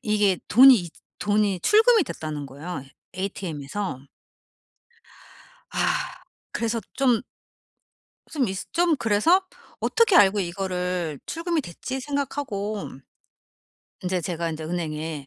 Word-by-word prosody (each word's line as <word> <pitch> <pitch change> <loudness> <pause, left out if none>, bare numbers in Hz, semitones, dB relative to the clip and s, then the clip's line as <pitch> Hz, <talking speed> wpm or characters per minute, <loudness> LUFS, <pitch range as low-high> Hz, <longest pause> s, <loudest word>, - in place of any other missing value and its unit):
이게 205 -4 +2
돈이 265 +3 +9
이 180 -7 -1 0.3
돈이 205 -3 +1
출금이 445 - +5
됐다는 150 - -5
거예요, 145 +2 -7 0.3
ATM에서. 180 -5 -4 1.6
아. - - -5 0.7
그래서 230 0 -1
좀 250 -5 +2 1.1
좀 280 -5 +1
이스 190 0 -4
좀 340 -2 +3
그래서 245 - +3 0.4
'어떻게 460 -5 +3
알고 205 - +6
이거를 180 -3 -2
출금이 335 0 -1
됐지?' 260 - -6
생각하고 255 -7 -3 1.1
인제 180 0 -1
제가 170 -1 -3
인제 155 0 -6
은행에 155 -3 -4
200 Hz, 230 characters per minute, -25 LUFS, 170-260 Hz, 1.6 s, 돈이